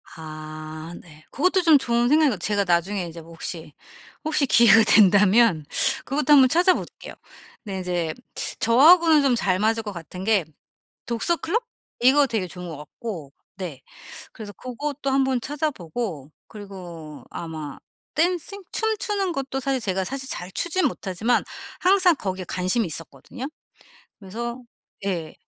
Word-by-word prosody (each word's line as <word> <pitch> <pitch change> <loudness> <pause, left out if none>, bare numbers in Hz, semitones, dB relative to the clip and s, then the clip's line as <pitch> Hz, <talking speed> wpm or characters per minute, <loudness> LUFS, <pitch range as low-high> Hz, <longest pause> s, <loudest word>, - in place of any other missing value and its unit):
아 155 +1 -8
네. 155 -2 -17
고것도 365 +5 +2
좀 325 -3 +6
좋은 240 -2 +1
생각인 305 0 +5
것 235 - -1
같 - - -13
제가 205 -1 +1
나중에 180 +2 0
이제 165 0 -9
뭐 165 - -15
혹시, 165 -2 -7 0.5
혹시 305 -2 +2
기회가 230 -3 +6
된다면 205 -4 +5 0.4
그것도 295 +2 +2
한번 265 -3 +7
찾아 360 +4 +4
볼게요. - - -8 0.5
근데 195 -4 -5
이제 175 -3 -2 0.5
저하고는 310 +6 +6
좀 265 -3 +3
잘 185 -3 0
맞을 225 +1 +1
것 210 - -5
같은 180 +2 -8
게 205 -5 +2 0.6
독서 235 +9 0
클럽? 455 +9 -1 0.4
이거 275 +3 +5
되게 215 -7 -2
좋은 180 +1 -8
것 160 - -7
같고. 150 0 -8 0.3
네. 170 -9 -6 0.5
그래서 215 -2 -9
고것도 275 +4 -5
한번 265 -1 +2
찾아 295 +3 -2
보고 165 - -6 0.2
그리고 180 -7 -10
아마 155 -4 -7 0.4
댄싱? 355 +5 0
춤추는 420 -3 -1
것도 270 -1 -3
사실 270 0 -1
제가 190 -3 -1
사실 265 +7 -5
잘 180 +1 -5
추진 345 - 0
못하지만 220 +2 -1 0.4
항상 370 -2 +4
거기에 190 -7 -4
관심이 185 +6 0
있었거든요. 165 - -8 0.8
그래서 235 +5 -6 0.5
예. 170 -5 -3
220 Hz, 295 characters per minute, -23 LUFS, 175-275 Hz, 0.8 s, 한번